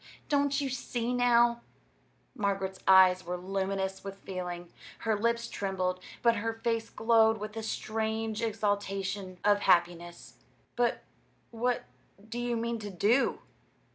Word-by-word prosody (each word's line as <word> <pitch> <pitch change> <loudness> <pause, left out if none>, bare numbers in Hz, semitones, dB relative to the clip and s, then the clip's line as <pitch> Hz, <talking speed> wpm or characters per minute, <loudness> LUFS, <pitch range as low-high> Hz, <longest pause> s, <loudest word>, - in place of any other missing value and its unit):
Don't 285 -1 +2
you 280 - -1
see 245 -1 -3
now?" 240 -1 +4 0.7
Margaret's 195 -4 -2
eyes 185 -1 +7
were 180 +1 -4
luminous 190 +1 -2
with 195 0 -7
feeling. 180 -3 -6 0.2
Her 220 -1 0
lips 235 +2 0
trembled; 185 -4 -2 0.2
but 235 -1 +4
her 225 +2 -1
face 225 0 -2
glowed 225 -1 +3
with 215 +1 -7
a 225 - -3
strange 220 0 -2
exaltation 200 -3 -2
of 205 0 +5
happiness. 175 -2 +1 0.4
"But 240 -1 +1 0.5
what 240 +2 0 0.4
do 235 +2 -5
you 240 -1 -1
mean 235 0 -2
to 210 -1 -6
do?" 210 +8 +2
215 Hz, 130 wpm, -30 LUFS, 190-235 Hz, 0.7 s, eyes